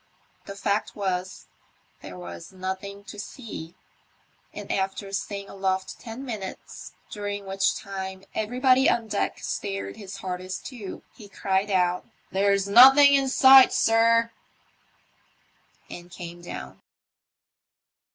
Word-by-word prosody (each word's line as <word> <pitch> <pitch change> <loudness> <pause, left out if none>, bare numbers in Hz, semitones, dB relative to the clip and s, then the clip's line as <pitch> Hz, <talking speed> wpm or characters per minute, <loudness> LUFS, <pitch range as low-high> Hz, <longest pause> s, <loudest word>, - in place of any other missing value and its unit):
The 200 - -7
fact 200 +1 -1
was, 185 -2 -3 0.5
there 90 -2 -10
was 85 -1 -9
nothing 190 +2 -6
to 205 0 -10
see; 200 -7 -8 0.8
and - - -7
after 195 +1 -2
staying 200 0 -4
aloft 190 -1 -3
ten 240 +3 -8
minutes, 210 -7 -7 0.2
during 205 -1 -5
which 195 0 +1
time 190 -1 -6
everybody 255 +4 +3
on 230 -1 0
deck - - -2
stared 100 0 -4
his 195 -2 -9
hardest 185 0 -6
too, 230 -8 -8
he 210 -3 -14
cried 195 +1 -1
out, 180 -2 +1
" - - -38
There's 200 0 +2
nothen 265 +7 +9
in 275 -1 +3
sight, 265 0 +8
sir," 230 +1 +3 1.6
and 175 0 -10
came 175 -1 -9
down. 65 - -9
200 Hz, 120 wpm, -25 LUFS, 185-225 Hz, 1.6 s, nothen